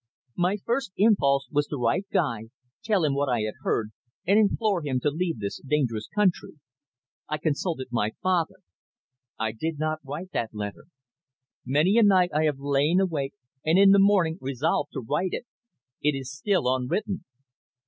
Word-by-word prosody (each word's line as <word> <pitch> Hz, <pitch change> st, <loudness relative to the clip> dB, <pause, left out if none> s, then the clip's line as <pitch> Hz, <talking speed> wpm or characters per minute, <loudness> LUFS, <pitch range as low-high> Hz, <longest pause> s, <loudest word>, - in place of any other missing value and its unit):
"My 180 Hz, +3 st, +1 dB
first 235 Hz, -4 st, -1 dB
impulse 140 Hz, -, +3 dB
was 145 Hz, 0 st, +1 dB
to 145 Hz, -, -4 dB
write 125 Hz, -, 0 dB
to -, -, -30 dB
Guy, 145 Hz, -, +1 dB, 0.4 s
tell 210 Hz, -5 st, +1 dB
him 145 Hz, -, +1 dB
what 140 Hz, 0 st, 0 dB
I 120 Hz, -3 st, +1 dB
had 110 Hz, 0 st, -2 dB
heard, 110 Hz, -1 st, -1 dB, 0.3 s
and 200 Hz, +4 st, +4 dB
implore 210 Hz, -3 st, +2 dB
him 135 Hz, -4 st, -1 dB
to 145 Hz, -, +1 dB
leave 165 Hz, -1 st, -2 dB
this 100 Hz, -2 st, -5 dB
dangerous 130 Hz, -7 st, -1 dB
country. 205 Hz, -4 st, 0 dB, 0.8 s
I 155 Hz, -, -1 dB
consulted 150 Hz, -2 st, -2 dB
my 110 Hz, -2 st, 0 dB
father. 180 Hz, -3 st, +1 dB, 0.8 s
I 110 Hz, 0 st, -1 dB
did 155 Hz, +8 st, -4 dB
not 155 Hz, +1 st, -1 dB
write 150 Hz, +7 st, -7 dB
that 110 Hz, -2 st, -3 dB
letter. 105 Hz, +2 st, -6 dB, 0.8 s
Many 155 Hz, -, +3 dB
a -, -, +6 dB
night 185 Hz, -3 st, +4 dB
I 155 Hz, +1 st, +2 dB
have 150 Hz, -3 st, +1 dB
lain 145 Hz, +5 st, +2 dB
awake, 155 Hz, -8 st, -1 dB, 0.3 s
and 160 Hz, +3 st, +3 dB
in 195 Hz, 0 st, +7 dB
the 200 Hz, -, +6 dB
morning 190 Hz, -4 st, +3 dB
resolved 140 Hz, +3 st, -1 dB
to -, -, -4 dB
write 175 Hz, +10 st, -1 dB
it. -, -, -4 dB, 0.6 s
It 150 Hz, -1 st, +1 dB
is 135 Hz, +1 st, -7 dB
still 190 Hz, +3 st, +1 dB
unwritten." 185 Hz, -, -2 dB
155 Hz, 170 wpm, -26 LUFS, 135-185 Hz, 0.8 s, in